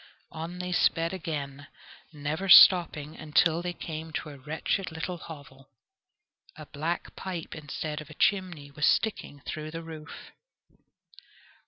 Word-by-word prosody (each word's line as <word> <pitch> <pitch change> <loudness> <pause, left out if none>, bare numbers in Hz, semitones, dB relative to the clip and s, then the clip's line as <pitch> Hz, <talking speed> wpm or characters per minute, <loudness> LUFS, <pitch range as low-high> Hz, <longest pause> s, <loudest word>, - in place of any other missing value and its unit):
On 165 +3 -6
they 180 0 -4
sped 165 -1 +2
again, 145 -6 -5 0.4
never 155 +5 -3
stopping 160 -5 +7
until 160 +2 +2
they 175 0 -2
came 160 -2 -6
to 150 - -3
a 140 - -11
wretched 160 +6 -2
little 165 +2 -4
hovel. 140 -4 -12 0.9
A 155 - -10
black 160 +4 -4
pipe 180 -4 -5
instead 155 0 -5
of 155 - -12
a 155 - -11
chimney 175 -9 0
was 150 +1 +1
sticking 175 -9 0
through 155 +2 -5
the 165 +1 -6
roof. 160 -1 -10
160 Hz, 135 wpm, -28 LUFS, 150-175 Hz, 0.9 s, stopping